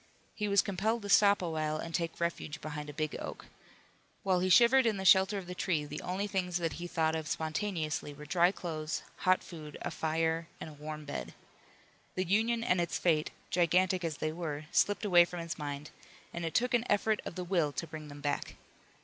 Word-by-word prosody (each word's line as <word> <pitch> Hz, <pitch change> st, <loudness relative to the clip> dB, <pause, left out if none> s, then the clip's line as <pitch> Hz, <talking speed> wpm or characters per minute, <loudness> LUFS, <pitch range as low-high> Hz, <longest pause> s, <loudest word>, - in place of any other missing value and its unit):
He 210 Hz, -, -2 dB
was 200 Hz, -1 st, +4 dB
compelled 210 Hz, +4 st, -1 dB
to 205 Hz, -, -5 dB
stop 200 Hz, -1 st, +5 dB
a 175 Hz, -, -1 dB
while 155 Hz, -1 st, -1 dB
and 165 Hz, +1 st, -6 dB
take 165 Hz, -1 st, -2 dB
refuge 170 Hz, -3 st, -2 dB
behind 150 Hz, -1 st, -6 dB
a -, -, -4 dB
big 155 Hz, +1 st, -3 dB
oak. -, -, -7 dB, 0.8 s
While 185 Hz, -2 st, +2 dB
he 185 Hz, +1 st, +1 dB
shivered 240 Hz, +6 st, +6 dB
in 215 Hz, -3 st, +1 dB
the 190 Hz, -, -4 dB
shelter 190 Hz, +2 st, +6 dB
of 190 Hz, -, -5 dB
the 180 Hz, -, -6 dB
tree 170 Hz, -4 st, 0 dB
the -, -, -6 dB
only 185 Hz, +3 st, -2 dB
things 185 Hz, -3 st, -1 dB
that 165 Hz, -2 st, -1 dB
he 175 Hz, -, -4 dB
thought 160 Hz, -2 st, +1 dB
of 160 Hz, -1 st, -3 dB
spontaneously 160 Hz, -2 st, -2 dB
were 150 Hz, +1 st, -10 dB
dry 175 Hz, +2 st, +4 dB
clothes, 160 Hz, -3 st, -4 dB
hot 185 Hz, -1 st, +3 dB
food, 155 Hz, -4 st, -9 dB
a -, -, -2 dB
fire 160 Hz, +1 st, 0 dB
and 155 Hz, -, -7 dB
a -, -, -12 dB
warm 150 Hz, +1 st, -7 dB
bed. 65 Hz, -, -5 dB, 0.8 s
The 185 Hz, -, 0 dB
Union 225 Hz, +5 st, +2 dB
and 180 Hz, -6 st, +2 dB
its 170 Hz, -, -1 dB
fate, 155 Hz, -3 st, +2 dB, 0.2 s
gigantic 180 Hz, +1 st, +3 dB
as 160 Hz, -3 st, -2 dB
they 155 Hz, -, -1 dB
were, 155 Hz, -3 st, -4 dB
slipped 205 Hz, +1 st, +2 dB
away 175 Hz, -4 st, +7 dB
from 175 Hz, 0 st, -6 dB
his 165 Hz, -1 st, -5 dB
mind, 145 Hz, 0 st, -5 dB, 0.4 s
and 170 Hz, -1 st, -3 dB
it 165 Hz, -, -4 dB
took 250 Hz, +1 st, +2 dB
an 240 Hz, -1 st, +3 dB
effort 210 Hz, +1 st, +2 dB
of -, -, -6 dB
the 180 Hz, -, -3 dB
will 170 Hz, -5 st, +1 dB
to 170 Hz, -, -3 dB
bring 155 Hz, -2 st, -8 dB
them 145 Hz, 0 st, -10 dB
back. 145 Hz, -1 st, -2 dB
170 Hz, 215 wpm, -32 LUFS, 155-190 Hz, 0.8 s, away